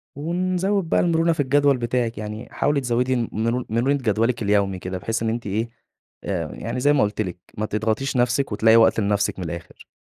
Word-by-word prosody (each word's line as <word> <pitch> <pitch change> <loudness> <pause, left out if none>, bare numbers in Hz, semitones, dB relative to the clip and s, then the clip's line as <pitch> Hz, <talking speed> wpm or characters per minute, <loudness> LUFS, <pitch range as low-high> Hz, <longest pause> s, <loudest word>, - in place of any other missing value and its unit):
ونزوّد 180 +4 -1
بقى - - +3
المرونة 165 -1 +2
في 160 - -11
الجدول 145 0 +3
بتاعِك، 120 -1 -1
يعني 105 +1 -6
حاولي 145 -1 +1
تزوّدي 125 +1 0 0.2
مر 115 +3 -1
مرونة 120 +5 +1
جدولِك 115 -1 0
اليومي 100 -2 +1
كده، 90 0 -5
بحيث 115 +4 -2
إن 115 - 0
أنتِ 115 0 -3
إيه، 110 +4 -1 0.5
آآ، 85 -6 -3
يعني 115 +3 -4
زي 145 +3 +4
ما 145 - +3
قُلت 105 +1 -1
لِك، 90 -3 -4 0.2
ما 110 - -1
تضغطيش 110 +5 -1
نفسِك 125 +2 +1
وتلاقي 110 +2 +4
وقت 115 0 +5
لنفسِك 100 -1 0
من 90 - -4
الآخر. 85 +1 -8
115 Hz, 190 wpm, -23 LUFS, 105-140 Hz, 0.5 s, وقت